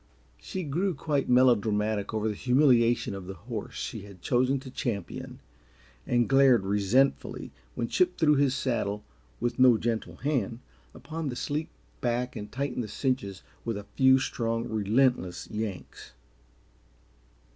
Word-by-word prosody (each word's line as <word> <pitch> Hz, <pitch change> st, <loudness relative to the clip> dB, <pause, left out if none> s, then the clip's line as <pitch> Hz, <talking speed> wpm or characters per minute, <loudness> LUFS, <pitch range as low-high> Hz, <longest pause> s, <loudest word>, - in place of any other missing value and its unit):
She 185 Hz, -, -5 dB
grew 170 Hz, +5 st, -1 dB
quite 145 Hz, 0 st, -1 dB
melodramatic 110 Hz, -4 st, +3 dB
over 110 Hz, -1 st, -1 dB
the 110 Hz, -, 0 dB
humiliation 125 Hz, -2 st, +3 dB
of 95 Hz, -2 st, -7 dB
the 95 Hz, -, -6 dB
horse 110 Hz, +6 st, -7 dB
she 110 Hz, -, -5 dB
had 100 Hz, -2 st, -12 dB
chosen 130 Hz, +2 st, +2 dB
to 130 Hz, -, -10 dB
champion, 105 Hz, -8 st, -4 dB, 0.7 s
and 120 Hz, -1 st, +2 dB
glared 135 Hz, -6 st, +5 dB
resentfully 105 Hz, +7 st, +1 dB, 0.2 s
when 115 Hz, -, -2 dB
Chip 180 Hz, +6 st, +1 dB
threw 155 Hz, -3 st, +4 dB
his 140 Hz, -2 st, +2 dB
saddle, 110 Hz, -6 st, -1 dB, 0.4 s
with 120 Hz, +1 st, -2 dB
no 125 Hz, -3 st, +7 dB
gentle 115 Hz, 0 st, -2 dB
hand, 130 Hz, -6 st, -1 dB, 0.4 s
upon 155 Hz, -1 st, -5 dB
the 125 Hz, -, -4 dB
sleek 150 Hz, +5 st, -2 dB, 0.3 s
back 120 Hz, +1 st, -1 dB
and 105 Hz, 0 st, -7 dB
tightened 130 Hz, -1 st, -2 dB
the -, -, -6 dB
cinches 105 Hz, -5 st, -2 dB, 0.2 s
with 115 Hz, -3 st, -2 dB
a 100 Hz, -, -7 dB
few 130 Hz, 0 st, +6 dB
strong, 115 Hz, -2 st, -2 dB
relentless 110 Hz, -3 st, +1 dB
yanks. 105 Hz, -5 st, -6 dB
120 Hz, 140 wpm, -28 LUFS, 105-135 Hz, 0.7 s, no